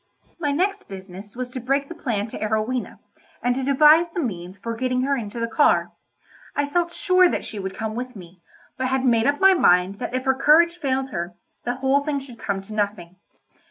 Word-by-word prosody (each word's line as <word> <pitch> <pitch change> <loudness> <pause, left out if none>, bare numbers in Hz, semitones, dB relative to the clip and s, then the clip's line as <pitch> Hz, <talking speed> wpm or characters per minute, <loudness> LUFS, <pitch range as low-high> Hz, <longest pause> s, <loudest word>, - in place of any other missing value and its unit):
My 295 -4 0
next 390 +7 -1
business 195 +2 -10
was 250 0 -5
to 255 - -5
break 275 +3 0
the - - -7
plan 230 -11 -2
to - - -7
Arowhena, 220 +3 -2 0.5
and 245 - +2
to 265 +1 -3
devise 300 +5 +6
the - - -1
means 185 - -4
for 230 +4 -5
getting 255 +1 0
her 280 +1 +1
into 230 -2 -5
the 230 - -1
car. 290 +6 +2 0.6
I 285 - +1
felt 340 +3 0
sure 365 0 +4
that - - -2
she 210 - -6
would 190 -1 -5
come 220 0 -3
with 250 +1 -5
me, 180 -2 -13 0.4
but 260 - -1
had 265 0 0
made 230 -1 +3
up 285 0 +1
my 385 0 +7
mind 185 - +3
that 250 - -4
if 255 +1 -2
her 265 - +4
courage 335 +6 +4
failed 265 -2 -1
her, 175 -1 -4 0.3
the 245 0 -1
whole 270 +2 +1
thing 290 -1 -1
should 260 -4 -12
come 195 -1 -3
to 215 - -10
nothing. 200 -4 -3
255 Hz, 215 wpm, -23 LUFS, 210-285 Hz, 0.6 s, my